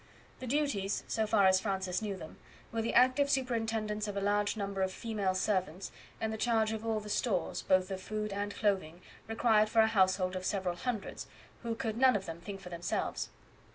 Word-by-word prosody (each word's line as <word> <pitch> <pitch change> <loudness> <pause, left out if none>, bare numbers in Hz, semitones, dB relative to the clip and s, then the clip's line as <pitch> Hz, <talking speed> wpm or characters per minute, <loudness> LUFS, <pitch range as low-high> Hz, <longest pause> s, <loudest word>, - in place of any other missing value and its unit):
The 255 - -6
duties, 245 -8 0
so 220 -1 0
far 210 -2 +4
as 190 0 +6
Francis 190 -2 -1
knew 205 -3 -3
them, 160 - -10 0.3
were 230 - -1
the 225 - -2
active 260 +3 +5
superintendence 225 -5 0
of 200 -1 -4
a - - +2
large 205 +1 +1
number 200 -1 -2
of 190 0 +1
female 200 -3 -2
servants, 185 -2 -1 0.3
and 220 0 -1
the - - -3
charge 220 -2 +2
of 220 0 -4
all 225 -1 0
the 210 - -9
stores, 205 -3 0
both 185 0 +2
of 190 -1 -4
food 215 +1 -3
and 205 +1 -3
clothing, 185 -5 0 0.2
required 220 -1 +3
for 225 0 +5
a - - +4
household 185 -3 +2
of 185 - -3
several 185 -2 -1
hundreds, 225 0 -4 0.3
who 230 -2 -2
could 225 -2 -3
none 260 -2 +6
of 195 -2 -1
them 165 0 -7
think 195 +2 -7
for 180 - -9
themselves. 170 0 -2
205 Hz, 200 wpm, -32 LUFS, 190-225 Hz, 0.3 s, as